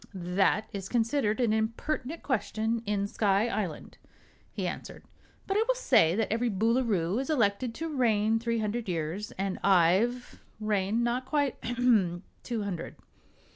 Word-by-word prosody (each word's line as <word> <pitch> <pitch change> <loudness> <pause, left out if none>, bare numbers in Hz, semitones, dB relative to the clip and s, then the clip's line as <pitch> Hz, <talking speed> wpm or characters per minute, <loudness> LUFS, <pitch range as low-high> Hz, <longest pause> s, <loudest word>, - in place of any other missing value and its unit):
"That 185 +4 +1
is 195 -2 -5
considered 230 -1 +1
an 235 -3 +2
impertinent 250 +7 -2
question 225 -3 -1
in 205 -1 0
Sky 200 +1 +1
Island," 200 -8 -4 0.5
he - - -4
answered; - - -7 0.4
"but 390 - -2
I 435 - +4
will - - +2
say 225 - +4
that 220 -1 0
every 235 +1 0
Boolooroo 220 -3 +1
is 270 - -6
elected 230 -3 +1
to 325 -2 -4
reign 225 -3 +2
three 230 0 -1
hundred 220 0 -2
years, 170 +4 -3
and 195 0 -3
I've 195 +7 +2 0.2
reigned 215 +1 0
not 245 +2 -1
quite 285 -2 0
ahem! 225 -8 +2 0.2
two 230 -4 -3
hundred." 180 -5 -5
220 Hz, 145 wpm, -29 LUFS, 200-245 Hz, 0.5 s, I